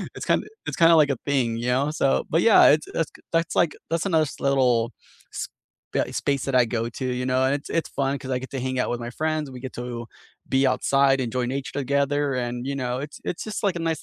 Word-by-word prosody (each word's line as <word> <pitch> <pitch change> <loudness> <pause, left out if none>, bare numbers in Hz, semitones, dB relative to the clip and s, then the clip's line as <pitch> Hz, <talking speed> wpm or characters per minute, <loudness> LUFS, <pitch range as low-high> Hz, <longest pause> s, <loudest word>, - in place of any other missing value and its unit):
it's - - -6
kinda - - +1 0.2
it's - - -3
kinda, 165 0 +8
like, 150 -3 +5
a 130 - -2
thing, 120 -5 +1
you 120 +1 -3
know, 140 +4 +1
so. 135 - +2
But 165 - +4
yeah, 225 - +7
it's 155 - 0
it's 165 - -1
k - - -15
that's, 165 0 +1
like 170 -3 +3 0.2
that's 165 +3 0
another 160 -3 +3
s - - -12
little 125 -4 +2 0.4
s - - -4 0.4
b - - +1
eh, - - +2
s - - -4
space 140 -2 0
that 135 -2 -1
I - - +2
go 115 0 -2
to, 130 - -3
you 125 0 -2
know, 130 0 +2
and 135 - +2
it 140 - -13
it's 165 - -1
fun 140 0 -1
'cause 130 - -6
I 125 - 0
get 130 - -9
to 130 - -2
hang 130 -1 -1
out - - -2
with 120 0 -3
my 120 - -5
friends, 155 -3 -1
we 125 - -8
get 130 - -7
to 120 -1 -6 0.5
be 135 +1 +4
outside, 135 0 +3
enjoy 125 +1 -1
nature 135 +1 -4
together, 140 +1 +1
and, 120 +1 -5
you 140 - -2
know, 125 0 -1
it 150 - -19
it's 170 - -3
just, 215 -1 -4
like, 195 -3 +1
a - - -5
nice 160 - -2
135 Hz, 265 wpm, -24 LUFS, 125-150 Hz, 0.5 s, kinda